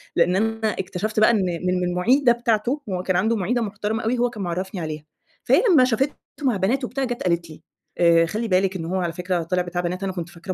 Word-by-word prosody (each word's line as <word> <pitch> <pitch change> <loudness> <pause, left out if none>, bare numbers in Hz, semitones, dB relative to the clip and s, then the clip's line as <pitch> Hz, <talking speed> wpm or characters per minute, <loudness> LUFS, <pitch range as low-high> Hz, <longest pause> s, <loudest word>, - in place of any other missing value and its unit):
لأن 175 +1 +3
أنا 225 +2 0
اكتشفت 210 +3 -2
بقى 215 - +6
إن - - +2
من 180 -1 -1
من - - 0
المُعيدة 240 +9 +3
بتاعته، 235 +4 0
هو 180 -1 -2
كان 185 - 0
عنده 220 +6 +2
مُعيدة 230 +4 0
محترمة 215 +1 -3
أوي، 240 +3 0
هو 245 +1 +2
كان 215 -4 -6
معرّفني 180 +1 -3
عليها، 155 -1 -5 0.4
فهي - - +4
لمّا 295 -7 +6
شافته 255 +4 0 0.3
مع 250 -6 +2
بنات 230 +9 0
وبتاع، 270 +2 -2
جات 245 -1 -3
قالت 170 -2 0
لي: 155 - -12 0.4
آآ 170 -1 +5
"خلّي 215 +7 -3
بالِك 190 -1 +1
إنّه 165 -3 -4
هو 185 - -2
على 170 -2 -2
فكرة 180 0 -2
طلع 180 +2 0
بتاع 175 0 -3
بنات، 180 +2 -3
أنا 195 - -1
كنت 175 -2 -5
فاكراه 175 +2 -6
190 Hz, 235 wpm, -23 LUFS, 175-225 Hz, 0.4 s, بقى